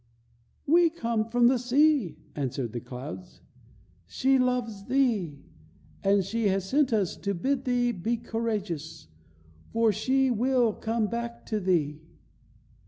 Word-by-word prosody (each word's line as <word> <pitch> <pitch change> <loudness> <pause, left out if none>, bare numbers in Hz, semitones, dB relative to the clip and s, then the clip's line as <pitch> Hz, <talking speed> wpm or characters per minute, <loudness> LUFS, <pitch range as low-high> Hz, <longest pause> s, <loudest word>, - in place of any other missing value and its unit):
"We 335 +3 +5
come 235 -9 -1
from 245 +1 +3
the 255 0 +3
sea," 250 - +2 0.2
answered 130 -4 -3
the 120 - -3
clouds. 135 +10 -9 0.7
"She 265 - +2
loves 245 -5 -1
thee, 225 - +1 0.7
and 195 -1 +3
she 220 +2 0
has 190 -1 0
sent 280 +3 +2
us 205 -6 +1
to 200 0 -2
bid 270 +9 -1
thee 245 -1 +2
be 230 +3 -2
courageous, 205 - -4 0.6
for 230 -1 +3
she 265 +5 +1
will 245 -1 +2
come 225 +1 -1
back 235 +2 -5
to 215 - +2
thee." 160 -6 0
225 Hz, 130 wpm, -27 LUFS, 190-250 Hz, 0.7 s, We